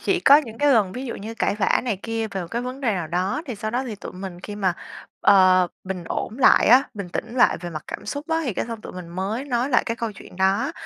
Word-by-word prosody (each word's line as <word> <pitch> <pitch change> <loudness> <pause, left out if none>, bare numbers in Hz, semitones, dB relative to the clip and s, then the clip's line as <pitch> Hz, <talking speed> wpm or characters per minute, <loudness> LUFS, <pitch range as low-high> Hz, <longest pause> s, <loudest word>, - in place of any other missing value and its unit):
Chỉ - - +1
có 280 - +8
những 230 -7 -3
cái 290 -1 +4
lần 205 -6 +3
ví 255 - -5
dụ 235 - -4
như 220 +3 -7
cãi 225 - 0
vã 200 - +2
này 220 -7 -1
kia 225 -1 -2
về 195 -2 -4
một 175 - -5
cái 235 +1 -2
vấn 255 +2 -6
đề 235 -5 +1
nào 175 -4 -3
đó 185 - -1
thì 250 - -4
sau 215 +1 -4
đó 250 +3 -1
thì 225 - -5
tụi 205 - -9
mình 185 -1 -8
khi 205 +2 -7
mà, 190 -3 +1 0.5
ờ, 185 -2 +6 0.2
bình 185 -2 -5
ổn 220 +7 -4
lại 270 - +6
á, 250 +4 +7
bình 200 -3 -6
tĩnh 225 +6 -5
lại 245 - +4
về 175 - -6
mặt 155 -2 -7
cảm - - -7
xúc 290 +2 -5
á 325 0 +1
thì 250 - -1
cái - - -2
xong 230 -2 -6
tụi - - -9
mình 180 -2 -8
mới 195 +8 -3
nói 250 -1 0
lại 250 - +4
cái 230 - -2
câu 230 -2 -3
chuyện 180 - -14
đó, 195 +10 +1
215 Hz, 285 wpm, -23 LUFS, 190-245 Hz, 0.5 s, có